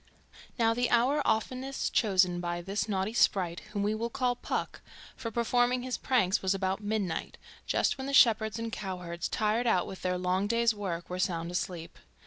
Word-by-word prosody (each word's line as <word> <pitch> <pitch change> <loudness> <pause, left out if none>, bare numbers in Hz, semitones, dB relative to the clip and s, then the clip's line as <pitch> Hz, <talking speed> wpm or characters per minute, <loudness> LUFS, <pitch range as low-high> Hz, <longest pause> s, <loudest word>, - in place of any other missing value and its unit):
Now 225 -1 +3
the 245 +1 0
hour 255 +5 +3
oftenest 255 +4 -1
chosen 185 -5 +3
by 175 0 -3
this 200 +3 -2
naughty 195 +2 -1
sprite 180 -7 +2
(whom 205 -1 -2
we 210 +1 +1
will 230 +2 -2
call 250 -1 0
Puck) - - -4 0.3
for 230 - -5
performing 245 +2 +1
his 255 -1 -3
pranks 220 -8 +2
was 190 0 +1
about 190 +1 -1
midnight, 205 -4 -2 0.3
just - - +1
when 265 - -4
the - - -2
shepherds 220 -5 +5
and 230 0 -4
cowherds, 180 -5 -4
tired 220 +3 0
out 185 -6 +3
with 190 - -8
their 180 0 0
long 185 +2 0
day's 230 +1 +2
work, 185 -5 -4
were 180 0 -5
sound 170 -2 -1
asleep. 175 -2 -4
210 Hz, 180 wpm, -30 LUFS, 185-235 Hz, 0.3 s, shepherds